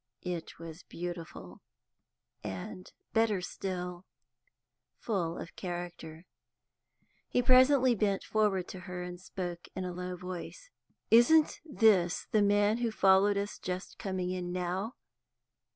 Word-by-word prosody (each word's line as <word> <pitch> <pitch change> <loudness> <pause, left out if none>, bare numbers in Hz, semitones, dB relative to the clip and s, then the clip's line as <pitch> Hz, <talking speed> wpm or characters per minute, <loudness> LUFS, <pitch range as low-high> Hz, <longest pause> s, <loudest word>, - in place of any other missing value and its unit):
It 175 -2 -5
was 165 +1 -9
beautiful, 170 - -7 0.8
and, 100 - -6 0.2
better 225 -3 +3
still, 180 0 -5 0.9
full 175 -7 -2
of 170 - -8
character. 175 -2 -6 1.0
He 245 - +2
presently 255 0 +6
bent 200 -3 0
forward 205 -4 +1
to 185 - -7
her, 180 0 -6
and 180 0 -7
spoke 175 -2 -6
in 185 - -3
a 180 - -4
low 180 0 -4
voice. 185 - -8 0.4
"Isn't 270 +8 +6
this 215 - +3
the 215 - +4
man 205 +2 +3
who 240 -1 +1
followed 200 -1 +4
us 200 +1 -3
just 185 +1 -5
coming 185 -2 -2
in 180 -1 -3
now? 185 +6 -2
185 Hz, 120 wpm, -31 LUFS, 175-210 Hz, 1.0 s, presently